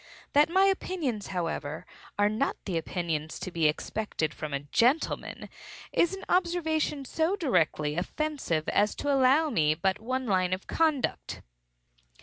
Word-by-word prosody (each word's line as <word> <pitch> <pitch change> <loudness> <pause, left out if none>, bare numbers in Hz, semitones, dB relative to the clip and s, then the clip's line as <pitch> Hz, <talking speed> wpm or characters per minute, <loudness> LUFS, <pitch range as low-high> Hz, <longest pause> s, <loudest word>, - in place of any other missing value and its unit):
That 295 +2 +5
my 380 +3 +4
opinions, 345 - 0
however, 165 -4 -3 0.3
are 205 0 +4
not 220 +6 0
the 185 - -3
opinions 160 -2 -2
to 185 - -6
be 165 -2 +2
expected 155 0 -2
from 155 -1 -6
a 140 0 -2
gentleman, 240 - 0 0.5
is 345 +3 +2
an 385 - -10
observation 320 -5 0
so 320 +8 0
directly 155 - +1
offensive 185 - -2
as 210 +1 +2
to 290 -1 0
allow 275 +4 +4
me 155 - +2
but 190 +5 0
one 255 +4 -2
line 185 -4 +1
of 185 - -4
conduct. 315 -5 0
220 Hz, 140 wpm, -28 LUFS, -, 0.5 s, That